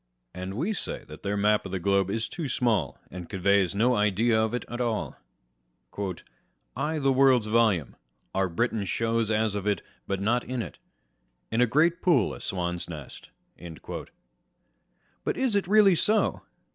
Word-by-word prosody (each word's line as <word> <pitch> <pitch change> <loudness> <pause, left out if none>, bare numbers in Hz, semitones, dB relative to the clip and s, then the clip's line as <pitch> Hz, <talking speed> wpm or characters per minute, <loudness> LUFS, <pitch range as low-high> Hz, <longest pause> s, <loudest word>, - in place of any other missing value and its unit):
And 95 +1 -6
we 170 - -1
say - - -4
that 75 - -10
their 100 +1 -2
map 105 +1 +3
of 95 - -7
the 95 - -1
globe 100 +1 +2
is 115 +3 -1
too 165 -4 -5
small, 120 -2 0
and 90 -1 -8
conveys 100 -1 +2
no 120 +5 +3
idea 110 +2 +2
of 110 +2 0
it 125 - -4
at 120 +1 -4
all. 115 -3 -2 1.6
I' 155 +1 -1
the 135 -2 +2
world's 130 -3 +4
volume 105 - +2 0.4
Our 95 -1 +1
Britain 110 +4 0
shows 115 +3 0
as 110 -1 +1
of 100 0 -3
it, 100 -4 0 0.2
but 100 -1 -1
not 115 +5 +1
in 125 -1 -3
*t; - - -8 0.7
In 115 +2 +2
a 125 - +5
great 165 +8 +2
pool 150 - +3
a - - -9
swan's 90 -2 -3
nest 75 -5 -9 0.3
i1 85 -2 -8 1.2
but - - -1
is 260 -5 +1
it 200 -3 +1
really 205 -1 +6
so 210 +6 +1
110 Hz, 170 wpm, -27 LUFS, 95-125 Hz, 1.6 s, really